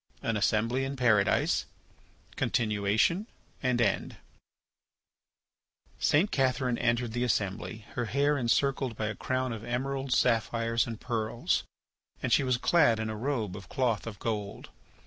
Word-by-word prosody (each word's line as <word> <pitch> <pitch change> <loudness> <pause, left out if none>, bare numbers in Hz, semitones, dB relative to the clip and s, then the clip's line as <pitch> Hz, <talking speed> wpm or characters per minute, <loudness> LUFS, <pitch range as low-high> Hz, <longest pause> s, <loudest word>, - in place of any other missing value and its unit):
AN 115 - 0
ASSEMBLY 115 +5 +1
IN 135 +1 -3
PARADISE 115 -6 +2 0.7
(Continuation 110 - +1 0.3
and 125 -2 +1
End) 105 -5 0 1.8
St. 170 +8 +3
Catherine 130 -2 +1
entered 120 0 +1
the 120 +2 -1
assembly, 110 -1 -2
her 120 - -1
head 140 +5 +1
encircled 135 0 +1
by 110 - -1
a 110 - -4
crown 130 +1 -2
of 110 -1 -7
emeralds, 135 +2 -1
sapphires, 115 0 +1
and 115 -2 -6
pearls, 115 -1 -1 0.6
and 125 -3 +1
she - - +5
was 130 -2 +1
clad 135 -5 +3
in 110 0 -2
a - - -4
robe 110 -5 -2
of 95 -4 -10
cloth 120 -5 0
of 105 -3 -6
gold. 105 -2 -4
120 Hz, 135 wpm, -29 LUFS, 110-130 Hz, 1.8 s, she